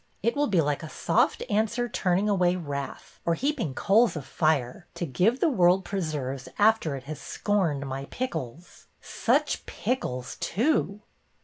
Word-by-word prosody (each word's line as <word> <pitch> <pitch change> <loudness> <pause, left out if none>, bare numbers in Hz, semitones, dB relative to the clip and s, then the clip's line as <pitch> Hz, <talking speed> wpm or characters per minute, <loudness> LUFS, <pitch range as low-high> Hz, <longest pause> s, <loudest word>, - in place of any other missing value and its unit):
It 230 +5 +1
will 290 0 +2
be 185 -8 +3
like 145 -1 -1
a 160 - -7
soft - - +1
answer 220 +2 0
turning 190 -2 +1
away 180 -3 +3
wrath, 140 -5 -6
or 170 - +1
heaping 255 - -1
coals 215 0 +3
of 145 -4 -5
fire, 155 0 0
to 175 - -2
give 185 - +1
the 340 - +3
world 185 -6 +3
preserves 150 -8 -3
after 210 -8 +3
it 135 - -7
has 150 +2 -7
scorned 170 -9 0
my 135 0 -4
pickles. 165 - -6
Such - - 0
pickles, 130 - -3
too 210 - 0
175 Hz, 150 wpm, -27 LUFS, 145-210 Hz, -, be